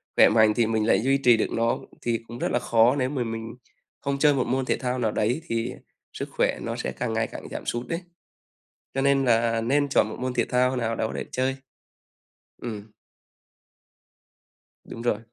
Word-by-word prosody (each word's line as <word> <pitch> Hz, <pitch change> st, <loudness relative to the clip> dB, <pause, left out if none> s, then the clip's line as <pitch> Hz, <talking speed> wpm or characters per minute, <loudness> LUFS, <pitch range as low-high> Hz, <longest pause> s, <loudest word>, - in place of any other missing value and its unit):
khỏe -, -, +7 dB
mạnh 110 Hz, -1 st, +5 dB
thì 115 Hz, -, +3 dB
mình 110 Hz, -1 st, 0 dB
lại -, -, +4 dB
duy 135 Hz, +3 st, +3 dB
trì 125 Hz, -4 st, +5 dB
được -, -, -1 dB
nó. 115 Hz, 0 st, +1 dB, 0.2 s
Thì 115 Hz, -1 st, 0 dB
cũng 120 Hz, +1 st, -8 dB
rất -, -, 0 dB
là 120 Hz, -, +2 dB
khó 120 Hz, +2 st, +4 dB
nếu 130 Hz, -2 st, 0 dB
mà 130 Hz, -4 st, -1 dB
mình 115 Hz, 0 st, -5 dB, 0.5 s
không 140 Hz, -1 st, -2 dB
chơi 150 Hz, 0 st, +5 dB
một 130 Hz, -2 st, 0 dB
môn 130 Hz, 0 st, 0 dB
thể -, -, +1 dB
thao 125 Hz, 0 st, -2 dB
nào 110 Hz, -3 st, +1 dB
đấy 120 Hz, +10 st, 0 dB
thì 115 Hz, +1 st, -2 dB, 0.4 s
sức -, -, -5 dB
khỏe -, -, 0 dB
nó -, -, -3 dB
sẽ -, -, -3 dB
càng 120 Hz, -2 st, -3 dB
ngày 110 Hz, 0 st, 0 dB
càng -, -, -9 dB
giảm -, -, -6 dB
sút 120 Hz, +1 st, -3 dB
đấy. 165 Hz, +2 st, -3 dB, 0.9 s
Cho 135 Hz, -, 0 dB
nên 140 Hz, -1 st, +3 dB
là 115 Hz, -1 st, +2 dB
nên 140 Hz, +5 st, +1 dB
chọn 120 Hz, -, +3 dB
một -, -, -7 dB
môn 130 Hz, 0 st, -2 dB
thể 120 Hz, -2 st, +1 dB
thao 125 Hz, +1 st, +2 dB
nào 115 Hz, -1 st, -1 dB
đó 110 Hz, 0 st, -1 dB
để -, -, -3 dB
chơi. 130 Hz, +1 st, 0 dB, 1.1 s
Ừm. 110 Hz, -2 st, -6 dB, 1.9 s
Đúng 115 Hz, -, -8 dB
rồi. 120 Hz, -3 st, +1 dB
120 Hz, 205 wpm, -25 LUFS, 115-130 Hz, 1.9 s, khỏe